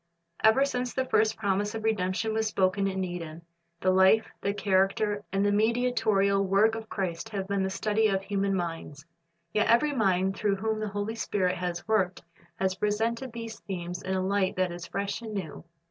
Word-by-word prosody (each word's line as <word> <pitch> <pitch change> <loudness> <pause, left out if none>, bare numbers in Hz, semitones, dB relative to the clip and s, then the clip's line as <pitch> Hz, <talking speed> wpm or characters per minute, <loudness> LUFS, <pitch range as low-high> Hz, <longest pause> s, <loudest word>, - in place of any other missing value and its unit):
Ever 220 +6 +5
since 250 -2 -3
the 260 - 0
first 220 -3 +2
promise 205 +1 0
of 220 - -4
redemption 215 0 0
Avas 220 0 0
spoken 195 -1 +1
in 190 -1 -2
Eden, 170 -2 -6 0.4
the 185 - +3
life, 190 +4 +4
the 200 - 0
character, 205 +1 +1
and 195 +1 +1
the 205 - +3
mediatorial 215 -3 +2
work 200 +3 +3
of 225 -1 -6
Christ 185 +1 -3
have 195 -3 -4
been 200 -1 0
the 190 - 0
study 215 +3 +1
of 195 -2 0
human 195 -1 0
minds. 165 -4 -5 0.5
Yet 215 - +2
every 285 +6 +4
mind 190 -5 +1
through 205 -1 +1
whom 220 +2 -2
the 215 - -2
Holy 205 +2 -3
Spirit 190 -5 0
has 175 0 -4
worked 190 -5 +1 0.3
has 190 +1 0
presented 225 +6 -1
these 230 -1 -7
themes 180 -3 -5
in 190 0 -2
a 185 0 0
light 195 -1 +1
that 185 -1 0
is 175 0 -7
fresh 200 +3 -3
and 220 -2 -6
new. 175 -4 -5
200 Hz, 190 wpm, -28 LUFS, 190-220 Hz, 0.5 s, Ever